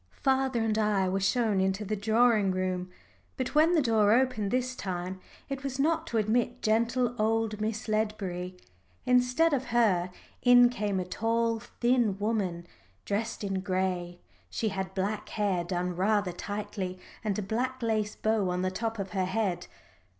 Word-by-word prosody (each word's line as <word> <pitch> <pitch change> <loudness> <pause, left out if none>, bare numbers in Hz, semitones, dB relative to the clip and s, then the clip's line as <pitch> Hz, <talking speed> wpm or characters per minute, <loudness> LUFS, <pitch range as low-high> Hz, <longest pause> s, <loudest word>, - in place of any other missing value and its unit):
Father 265 -3 +2
and 220 -1 +1
I 205 -3 +2
were 190 +1 0
shown 205 0 +2
into 190 +2 0
the 215 +2 -1
drawing 220 0 +3
room. 185 -1 -2 0.5
But 255 -1 -3
when 315 +3 +5
the 310 - +3
door 220 -4 +3
opened 240 -5 +1
this 255 +2 -1
time, 185 -2 -4 0.3
it 275 0 -5
was 270 -2 -3
not 320 +3 +1
to 230 - -1
admit 220 +3 0
gentle 235 +3 +1
old 220 -1 0
Miss 220 +2 -2
Ledbury. 195 -4 -2 0.5
Instead 250 +6 +3
of 265 -2 0
her 220 -8 +2 0.3
in 245 -1 +7
came 210 -5 -1
a 180 - -2
tall, 230 +4 0
thin 240 -3 0
woman, 200 -5 -1 0.4
dressed 220 +2 -2
in 195 -1 -1
gray 185 -2 -2 0.3
she 220 - -1
had 190 -1 -4
black 200 +2 -2
hair 200 -5 0
done 180 0 -2
rather 200 +1 +1
tightly, 200 0 -5 0.3
and 210 -3 -1
a 210 - -2
black 250 +5 -2
lace 215 -2 0
bow 215 -3 +1
on 180 +1 -1
the 185 - 0
top 225 +3 -3
of 195 -2 -4
her 190 -3 0
head. 190 -2 -1
215 Hz, 165 wpm, -29 LUFS, 190-235 Hz, 0.5 s, in